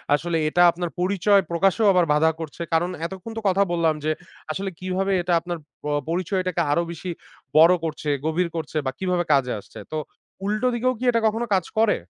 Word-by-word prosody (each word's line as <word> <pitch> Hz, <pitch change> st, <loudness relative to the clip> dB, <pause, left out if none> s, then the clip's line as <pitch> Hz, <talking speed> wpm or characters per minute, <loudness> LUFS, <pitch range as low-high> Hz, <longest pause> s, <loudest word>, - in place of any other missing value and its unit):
আসলে 165 Hz, +3 st, -1 dB
এটা 175 Hz, -, +2 dB
আপনার 175 Hz, 0 st, -4 dB
পরিচয় 195 Hz, +2 st, +3 dB
প্রকাশও 195 Hz, +6 st, +2 dB
আবার 180 Hz, -2 st, +4 dB
বাধা 160 Hz, +2 st, +4 dB
করছে। 160 Hz, 0 st, -7 dB
কারণ 170 Hz, +2 st, +2 dB, 0.2 s
এতক্ষণ 190 Hz, +5 st, -7 dB
তো -, -, -2 dB
কথা 195 Hz, +1 st, +3 dB
বললাম 165 Hz, -2 st, +2 dB
যে, 155 Hz, -, +2 dB, 0.4 s
আসলে 195 Hz, +5 st, -3 dB
কিভাবে 185 Hz, +1 st, -1 dB
এটা 175 Hz, 0 st, 0 dB
আপনার 175 Hz, +1 st, -5 dB, 0.3 s
প -, -, -11 dB, 0.2 s
পরিচয়টাকে 185 Hz, 0 st, -1 dB
আরো 170 Hz, +4 st, +2 dB
বেশি 170 Hz, +2 st, -6 dB, 0.5 s
বড় 165 Hz, +3 st, +8 dB
করছে, 155 Hz, -1 st, -4 dB, 0.2 s
গভীর 165 Hz, +3 st, +1 dB
করছে 160 Hz, -1 st, -4 dB
বা 130 Hz, -, 0 dB
কিভাবে 180 Hz, -2 st, 0 dB
কাজে 135 Hz, -3 st, +2 dB
আসছে। -, -, -13 dB
তো 155 Hz, -, -2 dB, 0.5 s
উল্টো 215 Hz, +5 st, 0 dB
দিকেও 250 Hz, +2 st, +1 dB
কি -, -, -6 dB
এটা 230 Hz, -1 st, +1 dB
কখনো 225 Hz, +2 st, -1 dB
কাজ 185 Hz, -3 st, +2 dB
করে? 220 Hz, -1 st, +4 dB
180 Hz, 190 wpm, -23 LUFS, 165-195 Hz, 0.5 s, বড়